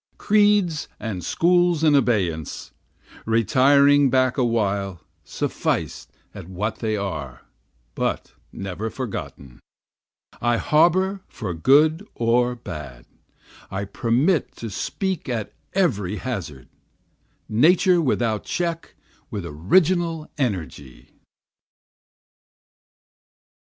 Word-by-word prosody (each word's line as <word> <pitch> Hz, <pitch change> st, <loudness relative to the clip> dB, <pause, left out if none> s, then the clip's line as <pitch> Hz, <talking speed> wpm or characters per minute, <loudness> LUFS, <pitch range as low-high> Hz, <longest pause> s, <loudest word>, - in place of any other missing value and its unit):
Creeds 205 Hz, -6 st, +2 dB
and 100 Hz, -6 st, -5 dB
schools 175 Hz, -, +2 dB
in 155 Hz, -2 st, +5 dB
abeyance, 95 Hz, -, 0 dB, 0.6 s
Retiring 135 Hz, +6 st, +4 dB
back 130 Hz, -1 st, +2 dB
a 130 Hz, -, +1 dB
while 100 Hz, -6 st, -1 dB, 0.2 s
sufficed -, -, -3 dB, 0.2 s
at 85 Hz, -, -10 dB
what 105 Hz, +4 st, -3 dB
they 110 Hz, -2 st, -2 dB
are, 75 Hz, -11 st, -5 dB, 0.5 s
but -, -, -3 dB, 0.2 s
never 95 Hz, +3 st, -5 dB
forgotten, 95 Hz, -, -7 dB, 0.8 s
I 120 Hz, 0 st, +2 dB
harbor 185 Hz, +7 st, +2 dB
for 100 Hz, -7 st, -5 dB
good 150 Hz, -, +4 dB
or 120 Hz, +1 st, +1 dB
bad, 75 Hz, -, -9 dB, 0.6 s
I 95 Hz, +1 st, -4 dB
permit 125 Hz, -, 0 dB
to 115 Hz, -2 st, -7 dB
speak 190 Hz, -, -3 dB
at 115 Hz, -4 st, -3 dB, 0.2 s
every 105 Hz, -, 0 dB
hazard, 95 Hz, -, -6 dB, 0.8 s
Nature 175 Hz, -, +4 dB
without 115 Hz, -7 st, 0 dB
check 170 Hz, -1 st, -3 dB, 0.3 s
with 105 Hz, -8 st, -5 dB
original 165 Hz, -, +1 dB
energy. 85 Hz, -, -4 dB
120 Hz, 90 wpm, -23 LUFS, 95-155 Hz, 0.8 s, in